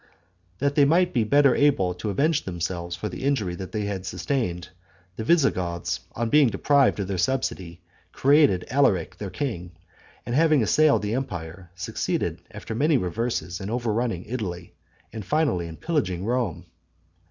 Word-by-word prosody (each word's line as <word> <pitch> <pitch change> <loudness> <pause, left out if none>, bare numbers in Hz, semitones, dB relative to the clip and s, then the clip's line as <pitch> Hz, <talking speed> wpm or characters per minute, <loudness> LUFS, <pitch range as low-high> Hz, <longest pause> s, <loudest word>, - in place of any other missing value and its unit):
That 140 +4 0
they 145 - +4
might 175 +5 +3
be 120 - +2
better 140 +3 +4
able 115 -11 +2
to 90 +4 -5
avenge 150 - +1
themselves 85 -1 -4
for 105 - -4
the 90 +4 -7
injury 130 -10 0
they 95 +4 -4
had 100 -2 -4
sustained, 95 - -3 0.5
the 110 - -4
Visigoths, 95 - +1
on 115 0 -2
being 150 -2 +6
deprived 135 +5 +2
of 100 - -2
their 95 -2 -3
subsidy, 90 -7 -2 0.3
created 140 - +3
Alaric 125 - +2
their 100 - -5
king; 90 - -4 0.5
and 120 - -4
having 155 -2 +4
assailed 150 +4 +3
the 105 +1 -1
empire, 90 -9 -5
succeeded, 90 - -2
after - - -7
many 145 +6 +2
reverses, 90 -2 -3
in 95 - -5
overrunning 115 -4 -1
Italy, 95 -8 -5 0.4
and 110 -2 -6
finally 140 - 0
in 80 -1 -9
pillaging 100 - -1
Rome. 120 -6 -1
110 Hz, 155 wpm, -25 LUFS, 90-140 Hz, 0.5 s, being